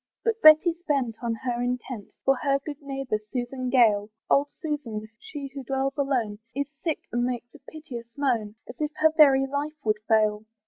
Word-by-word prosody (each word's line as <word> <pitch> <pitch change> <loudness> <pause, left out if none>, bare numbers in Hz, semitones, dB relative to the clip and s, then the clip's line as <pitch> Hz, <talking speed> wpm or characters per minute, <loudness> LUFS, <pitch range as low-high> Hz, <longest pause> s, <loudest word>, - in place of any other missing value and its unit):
But 455 -1 0
Betty's 325 +2 +7
bent 260 -7 0
on 230 -1 0
her 245 -2 -1
intent, 245 -3 -4
For 270 - +5
her 275 -1 +2
good 295 -1 -6
neighbour, 270 -5 -3
Susan 250 +4 -4
Gale, 220 -5 +4 0.2
Old 280 +1 +4
Susan, 255 -9 -4
she 290 -10 -7
who 275 -1 -6
dwells 270 +2 -1
alone, 250 -8 -1 0.2
Is 280 +1 -2
sick, 320 -3 -1
and 240 +1 0
makes 240 -1 -3
a - - -14
piteous 265 -7 -8
moan, 235 -7 0
As - - -10
if 300 - +1
her 315 0 +4
very 275 -3 +6
life 285 +3 -3
would 215 -1 +2
fail. 215 -1 +2
265 Hz, 180 wpm, -26 LUFS, 230-290 Hz, 0.2 s, Betty's